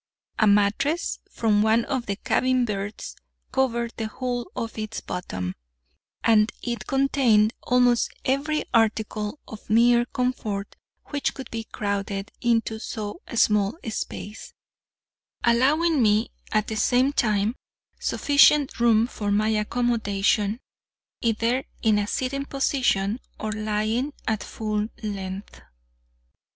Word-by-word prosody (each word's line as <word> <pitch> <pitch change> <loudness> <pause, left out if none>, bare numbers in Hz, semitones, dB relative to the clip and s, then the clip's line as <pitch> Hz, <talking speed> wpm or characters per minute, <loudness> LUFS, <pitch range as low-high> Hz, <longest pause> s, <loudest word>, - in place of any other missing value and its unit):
A 215 - +5
mattress 210 +11 +2
from 210 -2 +2
one 220 +2 +3
of 260 -4 -2
the 200 - -1
cabin 255 +4 +1
berths 205 -1 -5 0.4
covered 235 -3 0
the 220 - -2
whole 245 +1 -4
of 230 - -4
its 215 0 -4
bottom, 95 - -4 0.7
and 220 -1 +4
it 235 -5 -4
contained 255 -5 +3
almost 245 -1 +3
every 285 +4 0
article 220 +1 +1
of 215 -1 -11
mere 235 +2 +5
comfort 225 -6 -3 0.3
which 285 -1 -1
could 265 -3 -8
be 225 -1 -4
crowded 200 -1 -3
into 225 -2 +1
so 215 - -5
small 210 +1 +3
a 225 - -4
space, 210 0 -6 0.9
allowing 285 +6 +3
me, 215 0 +3 0.2
at 215 -1 +2
the 220 - -3
same 255 +6 +3
time, 215 -3 +1 0.4
sufficient 285 -1 +4
room 230 -1 +4
for 210 -4 -4
my 210 +2 +2
accommodation, 215 -1 +1 0.6
either 230 +3 +1 0.2
in 215 -2 +4
a 205 - -1
sitting 275 +4 -2
position 260 -7 0 0.2
or 215 - -3
lying 215 +5 -1
at 220 -2 0
full 215 -1 -2 0.2
length. 195 -1 -5
225 Hz, 120 wpm, -25 LUFS, 210-250 Hz, 0.9 s, A